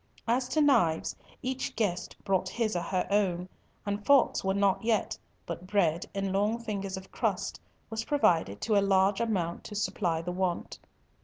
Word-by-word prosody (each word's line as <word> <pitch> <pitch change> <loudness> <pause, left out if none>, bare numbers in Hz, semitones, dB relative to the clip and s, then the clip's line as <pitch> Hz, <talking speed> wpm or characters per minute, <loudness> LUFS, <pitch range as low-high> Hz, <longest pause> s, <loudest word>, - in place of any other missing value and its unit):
As 250 +2 +2
to 310 - +1
knives, 175 - +3 0.3
each 260 0 -3
guest 200 -6 -1
brought 190 -1 +1
his 220 -2 -1
or 175 - 0
her 180 +1 -1
own, 185 -3 +1 0.4
and 205 0 -2
forks 280 +2 +4
were 190 0 +1
not 200 0 +2
yet, 225 -2 +1 0.3
but 170 +2 -6
bread, 180 -4 +1
in 195 -1 -1
long 205 +4 +2
fingers 200 -4 -4
of 190 - -10
crust, - - -1 0.3
was 220 0 -2
provided 165 - +2
to 220 - +1
a 200 - +5
large 195 +1 +3
amount 185 -7 -1
to 210 - -7
supply 175 -5 0
the 180 - -3
want. 180 -1 -2
195 Hz, 170 wpm, -29 LUFS, 180-220 Hz, 0.4 s, a